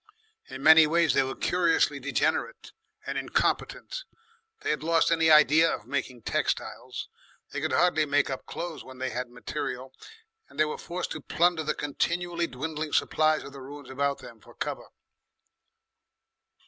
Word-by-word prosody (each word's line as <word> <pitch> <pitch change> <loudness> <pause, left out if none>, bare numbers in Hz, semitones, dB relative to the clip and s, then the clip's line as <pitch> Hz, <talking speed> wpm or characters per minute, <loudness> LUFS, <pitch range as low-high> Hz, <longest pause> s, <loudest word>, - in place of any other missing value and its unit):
In 130 +1 -8
many 160 +1 +8
ways 165 -3 +3
they 135 - +4
were 135 0 -3
curiously 175 -2 +2
degenerate - - -1 0.3
and - - -2
incompetent. - - -1 0.6
They 430 +1 0
had - - -1
lost 165 +1 +2
any 165 -1 +3
idea 155 +1 +6
of - - -5
making 130 -4 -4
textiles, - - -2 0.4
they - - -4
could - - -1
hardly 170 -4 +3
make 145 0 +2
up 130 - -6
clothes 170 -2 -6
when 130 0 -12
they 130 0 -3
had 125 -1 -4
material, 125 +1 -5 0.6
and - - -14
they 155 - +5
were 150 - -5
forced 180 +1 -4
to 155 - -5
plunder 175 +3 +2
the 150 - -1
continually 170 +4 -1
dwindling 150 +3 -5
supplies 155 0 +2
of 140 - -10
the 140 - -10
ruins 140 0 -10
about 140 +1 0
them 115 -2 -13
for - - -17
cover. - - -4
155 Hz, 160 wpm, -27 LUFS, 135-165 Hz, 0.6 s, many